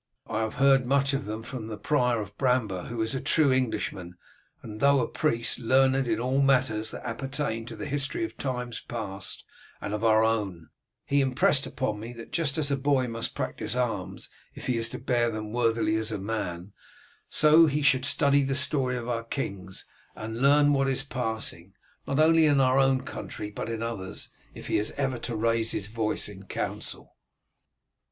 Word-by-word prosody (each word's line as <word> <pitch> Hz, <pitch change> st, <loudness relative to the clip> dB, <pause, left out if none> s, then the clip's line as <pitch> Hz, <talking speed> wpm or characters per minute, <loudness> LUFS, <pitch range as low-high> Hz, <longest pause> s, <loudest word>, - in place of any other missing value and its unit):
"I 110 Hz, -, -3 dB
have 110 Hz, +2 st, -2 dB
heard 135 Hz, -2 st, +4 dB
much 140 Hz, +1 st, +2 dB
of 135 Hz, +1 st, -1 dB
them 110 Hz, +1 st, -5 dB
from 120 Hz, -2 st, -6 dB
the 110 Hz, -1 st, -6 dB
prior 125 Hz, +1 st, +1 dB
of 100 Hz, -1 st, -7 dB
Bramber, 110 Hz, -8 st, 0 dB
who 115 Hz, -1 st, -2 dB
is 110 Hz, -, -1 dB
a 130 Hz, -, -2 dB
true 155 Hz, -4 st, +3 dB
Englishman, 110 Hz, -8 st, -1 dB, 0.5 s
and 110 Hz, -1 st, -8 dB
though 140 Hz, 0 st, +5 dB
a 120 Hz, -, 0 dB
priest, 115 Hz, -6 st, 0 dB
learned 130 Hz, +2 st, +3 dB
in 110 Hz, -1 st, 0 dB
all 130 Hz, +3 st, +1 dB
matters 130 Hz, -5 st, +2 dB
that -, -, -6 dB
appertain 120 Hz, -1 st, -3 dB
to -, -, -6 dB
the -, -, -6 dB
history 145 Hz, -, -1 dB
of 335 Hz, -, -9 dB
times 125 Hz, -3 st, -3 dB
past 100 Hz, -5 st, -5 dB, 0.4 s
and 100 Hz, -, -4 dB
of 105 Hz, +1 st, -3 dB
our 110 Hz, -1 st, +5 dB
own; 100 Hz, -8 st, -1 dB, 0.4 s
he 140 Hz, 0 st, +2 dB
impressed 135 Hz, +1 st, +2 dB
upon 110 Hz, -6 st, -2 dB
me 115 Hz, +3 st, -7 dB
that 115 Hz, -1 st, -11 dB
just 155 Hz, -4 st, 0 dB
as 145 Hz, -2 st, +1 dB
a 140 Hz, -, +2 dB
boy 135 Hz, -2 st, +1 dB
must 115 Hz, -1 st, -3 dB
practise 110 Hz, -, -3 dB
arms 115 Hz, -7 st, -3 dB, 0.2 s
if -, -, -8 dB
he 125 Hz, -, +1 dB
is 115 Hz, 0 st, +2 dB
to -, -, -5 dB
bear 120 Hz, -2 st, +1 dB
them 110 Hz, -1 st, -5 dB
worthily 115 Hz, -2 st, +1 dB
as 110 Hz, 0 st, -1 dB
a 105 Hz, -, -2 dB
man, 95 Hz, -3 st, -4 dB, 0.6 s
so 155 Hz, +2 st, +6 dB
he 150 Hz, 0 st, 0 dB
should 130 Hz, -2 st, +4 dB
study 140 Hz, 0 st, +3 dB
the 135 Hz, 0 st, 0 dB
story 135 Hz, -3 st, +1 dB
of 120 Hz, -1 st, -5 dB
our 115 Hz, -1 st, -2 dB
kings, 100 Hz, -7 st, -5 dB, 0.3 s
and 110 Hz, +2 st, -6 dB
learn 145 Hz, +1 st, +5 dB
what 135 Hz, -1 st, +2 dB
is 135 Hz, 0 st, 0 dB
passing, 110 Hz, -8 st, -3 dB, 0.3 s
not 140 Hz, -, 0 dB
only 160 Hz, 0 st, +6 dB
in 145 Hz, -2 st, +4 dB
our 130 Hz, 0 st, +4 dB
own 135 Hz, -1 st, +3 dB
country 105 Hz, 0 st, -7 dB
but 110 Hz, -, -5 dB
in 115 Hz, 0 st, -3 dB
others, 105 Hz, -5 st, -5 dB, 0.2 s
if -, -, -9 dB
he -, -, +1 dB
is 105 Hz, -, 0 dB
ever 135 Hz, -3 st, -1 dB
to 120 Hz, -, -4 dB
raise 115 Hz, +1 st, +1 dB
his 100 Hz, -, -2 dB
voice 110 Hz, -1 st, -1 dB
in 100 Hz, -2 st, -10 dB
council." -, -, -5 dB
120 Hz, 195 wpm, -27 LUFS, 110-135 Hz, 0.6 s, so